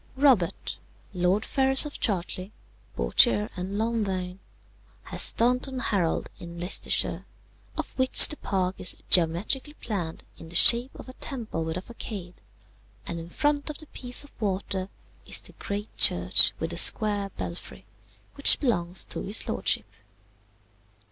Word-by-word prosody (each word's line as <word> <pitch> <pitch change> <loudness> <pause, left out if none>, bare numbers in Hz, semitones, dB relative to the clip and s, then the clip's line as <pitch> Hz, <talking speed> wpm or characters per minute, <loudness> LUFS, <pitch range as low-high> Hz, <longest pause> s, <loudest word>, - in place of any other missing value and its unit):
"Robert, 205 - 0 0.4
Lord 180 +4 -1
Ferrers 270 +1 +3
of 295 - -8
Chartly, 185 -1 -4 0.4
Bourchier, 105 - +1
and 185 +2 -6
Lonvaine, 195 -5 -3 0.6
has - - -1
Staunton 250 +3 +2
Harold 195 -9 -2
in 170 0 -11
Leicestershire, 180 +2 0 0.5
of - - -5
which 260 0 +8
the 300 - -6
park 185 -1 -3
is 180 - +1
geometrically 190 - +1
planned 180 - -6 0.2
in 165 - -12
the 170 - -9
shape 235 +7 +6
of - - -12
a 255 - -11
temple 230 - -6
with 160 +1 -5
a 185 - -7
façade, 200 -6 -9 0.7
and 170 - -6
in 165 +1 -10
front 290 - -2
of 300 - -7
the 310 - -9
piece 250 -3 +1
of 285 - -17
water 190 -1 -4 0.4
is - - +4
the - - -11
great 205 +1 -7
church 90 +3 +5
with 165 +1 -5
the 170 - -6
square 205 +2 +5
belfry, 170 - -8 0.5
which 280 -1 +5
belongs 180 - -1
to - - -6
his 205 +3 -2
lordship. 95 +2 -1
195 Hz, 140 wpm, -25 LUFS, 170-245 Hz, 0.7 s, which